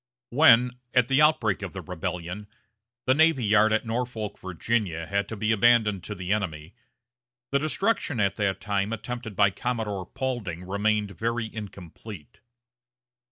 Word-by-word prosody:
When, 125 -3 +6 0.2
at 125 -2 +4
the 135 +2 +4
outbreak 125 -11 +3
of 100 -3 -6
the 95 - -6
rebellion, 90 +2 -5 0.6
the 130 - +4
navy 155 -4 +3
yard 105 +1 +4
at 110 +2 +1
Norfolk, 115 -2 -3
Virginia, 95 -2 -2
had 100 +4 -1
to 110 - -5
be 110 +2 0
abandoned 110 -3 +3
to 105 - -5
the 95 +1 -1
enemy, 85 -5 -4 0.8
the 140 - +3
destruction 155 - 0
at 100 -2 +1
that 100 -2 0
time 100 +1 -1
attempted 115 -1 -6
by 100 0 +4
Commodore 110 -6 -3
Paulding 120 -10 -4
remained 105 +1 0
very 115 +1 -3
incomplete. 100 -4 -10
105 Hz, 145 wpm, -26 LUFS, 95-120 Hz, 0.8 s, When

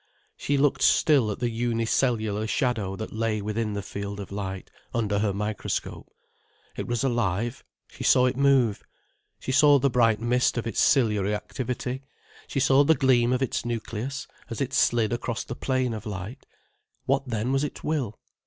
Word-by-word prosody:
She 145 - -1
looked 135 -1 +2
still 135 -5 +4
at 105 - -3
the 120 -1 -1
unicellular 115 -2 0
shadow 110 -6 -1
that 110 +2 -6
lay 110 -1 -1
within 105 +1 -2
the 100 -1 -3
field 100 +1 -6
of 100 - -7
light, 95 -2 -5 0.2
under 105 -3 0
her 105 -1 +1
microscope. 105 +2 -4 0.7
It - - -5
was 120 0 -1
alive. 120 -1 -1 0.2
She - - -9
saw 125 - +5
it 125 - +1
move—she 130 -2 -1
saw 145 +1 +6
the 140 0 +1
bright 115 -3 +3
mist 125 +2 +1
of 120 - -2
its 115 - -2
ciliary 105 -6 +3
activity, 125 +3 -4 0.5
she 135 - -2
saw 135 +1 +5
the 160 +3 +4
gleam 125 -4 +3
of 130 +1 +1
its 130 - -2
nucleus, 120 +3 -4 0.2
as 115 - -5
it 135 -2 -2
slid 120 -3 +2
across 120 -1 -3
the 120 - -6
plane 130 -2 -1
of 110 0 -6
light. 105 +6 -7 0.6
What 135 +1 0
then 115 +1 -1
was 135 +1 +1
its 150 - -5
will? 135 -9 -2
120 Hz, 170 wpm, -26 LUFS, 105-130 Hz, 0.7 s, saw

